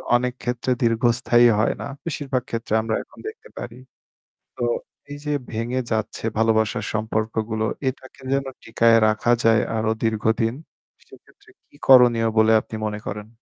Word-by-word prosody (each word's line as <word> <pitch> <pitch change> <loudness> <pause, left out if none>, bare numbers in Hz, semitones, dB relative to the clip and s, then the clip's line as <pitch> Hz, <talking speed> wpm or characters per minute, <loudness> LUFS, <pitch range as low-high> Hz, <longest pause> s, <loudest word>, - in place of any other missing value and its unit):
অনেক 125 0 0
ক্ষেত্রে 120 +1 -2
দীর্ঘস্থায়ী 120 +1 +3
হয় - - +2
না। - - -4 0.2
বেশিরভাগ 135 -5 -2
ক্ষেত্রে 115 -1 -4
আমরা 110 0 -1
এখন - - -20
দেখতে 455 +2 -10
পারি। - - -7 0.8
তো - - -3 0.5
এই 145 - -6
যে 150 - -1 0.2
ভেঙে 120 +3 -2
যাচ্ছে 110 -1 -2
ভালোবাসার 110 -1 +1
সম্পর্কগুলো 110 0 -2 0.2
এটাকে 130 +1 -6
যেন 140 0 0 0.2
টিকায় 115 0 +4
রাখা 110 +2 +1
যায় 115 -1 +4 0.2
আরো 110 0 0
দীর্ঘদিন। 110 +1 +1 0.5
সেক্ষেত্রে - - -20 0.2
কি - - -25
করণীয় 120 -3 +6
বলে 110 0 +5
আপনি 110 - -9
মনে 105 0 -4
করেন? 105 0 -5
115 Hz, 145 wpm, -22 LUFS, 110-125 Hz, 0.8 s, করণীয়